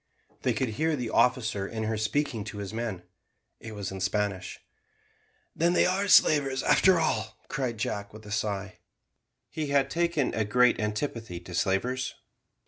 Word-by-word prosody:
They - - +1
could 130 - -1
hear 155 +9 0
the 125 -5 -4
officer 110 -6 +2
in 110 +1 -4
her 110 +1 -1
speaking 110 +1 -1
to 105 -1 -7
his 100 0 -6
men. 110 -6 -4 0.6
It 110 -1 -8
was 100 -2 -4
in 95 -1 -6
Spanish. 100 0 -2 1.0
"Then 170 +2 +2
they - - +4
are 195 +2 +1
slavers, 140 -7 +5
after 185 -3 +5
all," 160 - -1
cried 130 -5 -2
Jack, 100 -1 -3
with 110 0 -13
a 105 - -9
sigh. 100 -2 -3 0.7
He 155 -2 -3
had 140 -1 +2
taken 170 -5 0
a 110 - +1
great 125 +3 +3
antipathy 105 -3 -3
to 90 0 -10
slavers. 110 +9 0
115 Hz, 160 wpm, -28 LUFS, 105-140 Hz, 1.0 s, slavers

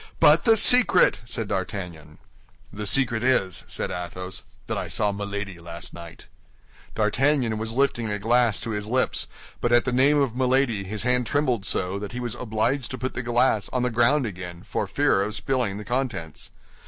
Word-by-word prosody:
"But - - +6
the 225 -2 +6
secret!" 245 -4 +6
said 115 -2 -4
D'Artagnan. 90 -6 -5 0.6
"The 105 0 -4
secret 115 -2 +2
is," 100 -9 +1
said - - -3
Athos, 90 +1 -5 0.2
"that - - -3
I - - -3
saw 105 - 0
Milady 100 -2 -5
last 85 0 -8
night." 85 -1 -11 0.7
D'Artagnan 115 +1 +1
was 110 0 -3
lifting 125 -4 +1
a 105 - -1
glass 115 +1 +2
to 115 - -4
his 105 -1 -3
lips; 130 +2 0 0.3
but 120 - -1
at 120 0 +4
the 130 - 0
name 135 +4 +4
of 135 -5 0
Milady, 125 -5 +1
his 105 +3 -4
hand 125 -1 +1
trembled 125 -7 0
so, 95 +2 -1
that 105 +1 -7
he 125 - -4
was 120 -3 -4
obliged 125 +3 -1
to 130 - -5
put 130 0 -4
the - - -3
glass 120 -3 +1
on 125 -1 -1
the 125 - 0
ground 120 +5 +3
again 90 -4 -7
for - - -3
fear 95 - +2
of 105 +2 -2
spilling 125 -7 -1
the 105 - -8
contents." 120 - -3
115 Hz, 185 wpm, -24 LUFS, 100-125 Hz, 0.7 s, But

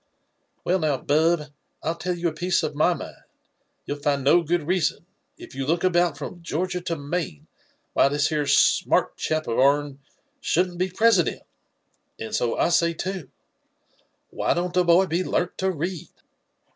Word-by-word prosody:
'' - - -47
Well 185 +2 +2
noWi 150 -5 -1
Bub, 160 +3 +3 0.4
Til 160 - 0
tell 180 +1 -3
you 170 0 0
a - - -8
piec^ 175 +2 0
of 155 -1 -2
my 155 +4 +2
mipd: - - -9 0.6
you'll 145 - -4
6nd 140 -2 0
qo 175 +5 +5
good 175 -1 +1
reason, 180 -2 0 0.3
if - - -12
you 135 +1 -3
look 170 +3 +1
about 175 -4 +2
from 170 +4 -7
Georgia 180 +2 -2
to 170 -1 -3
Maine, 145 - -4 0.5
why - - +4
this 145 +2 0
'ero 150 -2 0
smart - - +3
chap 155 0 -1
of 115 - -2
Qur'n 140 +1 +2 0.4
shouldn't 180 -7 0
be 185 +1 +1
President 195 -2 +2 0.4
— - - -46
and 110 - -6
so 120 - 0
I - - +2
say 170 -1 +2
(ao, 190 -4 -4 1.1
why - - 0
don't 175 0 -2
the 180 - +3
boy 175 +2 +5
be 175 +1 -1
learnt 180 -1 -1
to 190 - +1
read?" 175 0 -4
170 Hz, 175 wpm, -24 LUFS, 145-180 Hz, 1.1 s, qo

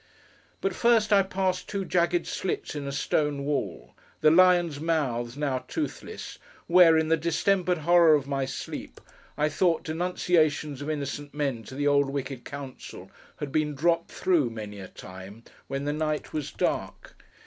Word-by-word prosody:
But 195 - 0
first 225 -1 +3
I 200 - +7
passed 185 -1 -2
two 200 -2 -2
jagged 175 -1 +1
slits 190 - -3
in 145 -2 -5
a - - -3
stone 145 0 0
wall; 145 0 -3 0.3
the 155 - +6
lions' 175 -3 +4
mouths—now 135 -4 -1
toothless—where, 180 - +1
in 160 0 +1
the 165 - +4
distempered 180 +3 +1
horror 170 0 +5
of 145 -2 -1
my 135 -1 -1
sleep, 130 - -7 0.4
I 150 0 +2
thought 165 +2 +1
denunciations 160 -4 0
of 145 - -4
innocent 145 -1 -4
men 140 -6 -1
to 130 - -9
the 145 +1 -1
old 140 -1 +3
wicked 135 -2 -5
Council, 140 -2 -9 0.3
had 145 -2 -5
been 150 -1 0
dropped 170 +3 +1
through, 165 -9 +1
many 105 -3 -7
a 95 - -8
time, 95 +4 -11 0.2
when 135 +1 -3
the 145 - 0
night 155 0 -2
was 150 -3 -3
dark. - - -3
150 Hz, 155 wpm, -27 LUFS, 140-175 Hz, 0.4 s, I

